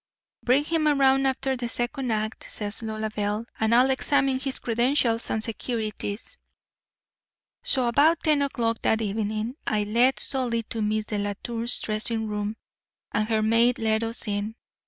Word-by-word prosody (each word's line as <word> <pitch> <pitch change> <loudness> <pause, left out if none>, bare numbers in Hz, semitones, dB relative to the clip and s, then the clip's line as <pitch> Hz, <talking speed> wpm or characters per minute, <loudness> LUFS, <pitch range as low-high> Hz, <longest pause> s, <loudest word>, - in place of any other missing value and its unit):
"'Bring 260 +4 +3
him 315 0 +1
around 270 -2 +4
after 265 0 0
the 240 -2 -4
second 250 +2 -2
act,' 215 0 -3
says 210 +1 -3
Lolabelle, 215 -1 -2
'and 220 +1 +3
I'll 255 +2 +5
examine 270 0 +2
his 265 0 -1
credentials 235 0 +1
and 220 - -1
securities.' 225 - -4 1.2
"So 255 -2 +2
about 305 +7 +4
ten 305 -3 +3
o'clock 230 -5 0
that 220 - +2
evening 215 +3 -2
I 215 -2 +1
led 235 +5 +3
Solly 245 -4 0
to 225 - -2
Miss 215 0 0
Delatour's 215 +3 -2
dressing 220 +1 -2
room, 210 0 -3 0.5
and 215 +1 0
her 220 -1 +2
maid 230 +3 +4
let 220 -1 +1
us 230 0 -2
in. 205 +2 -2
230 Hz, 145 wpm, -26 LUFS, 215-260 Hz, 1.2 s, I'll